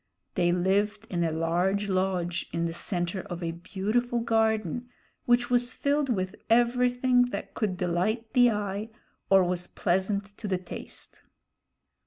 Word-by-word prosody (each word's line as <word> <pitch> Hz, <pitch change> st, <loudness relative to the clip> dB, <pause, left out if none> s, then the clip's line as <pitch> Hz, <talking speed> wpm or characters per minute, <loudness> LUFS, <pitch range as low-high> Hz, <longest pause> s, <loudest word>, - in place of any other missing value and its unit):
They 175 Hz, -2 st, +2 dB
lived 200 Hz, +4 st, +1 dB
in 175 Hz, -2 st, 0 dB
a 165 Hz, -, +1 dB
large 175 Hz, +5 st, 0 dB
lodge 185 Hz, -2 st, -1 dB
in 170 Hz, 0 st, -1 dB
the 165 Hz, -, -2 dB
center 175 Hz, +1 st, -2 dB
of 175 Hz, 0 st, -7 dB
a 165 Hz, -, -1 dB
beautiful 215 Hz, +8 st, -1 dB
garden, 225 Hz, 0 st, 0 dB, 0.4 s
which 240 Hz, 0 st, +2 dB
was 245 Hz, 0 st, +3 dB
filled 285 Hz, 0 st, 0 dB
with 185 Hz, -5 st, -1 dB
everything 245 Hz, +1 st, +3 dB
that 245 Hz, -, -6 dB
could 200 Hz, -5 st, -1 dB
delight 195 Hz, +6 st, -1 dB
the 245 Hz, -1 st, +6 dB
eye 205 Hz, 0 st, -2 dB, 0.4 s
or 195 Hz, -1 st, +6 dB
was 180 Hz, 0 st, -2 dB
pleasant 200 Hz, +3 st, -1 dB
to 215 Hz, -, -4 dB
the 190 Hz, -2 st, +1 dB
taste. 180 Hz, -, -9 dB
200 Hz, 145 wpm, -28 LUFS, 180-235 Hz, 0.4 s, the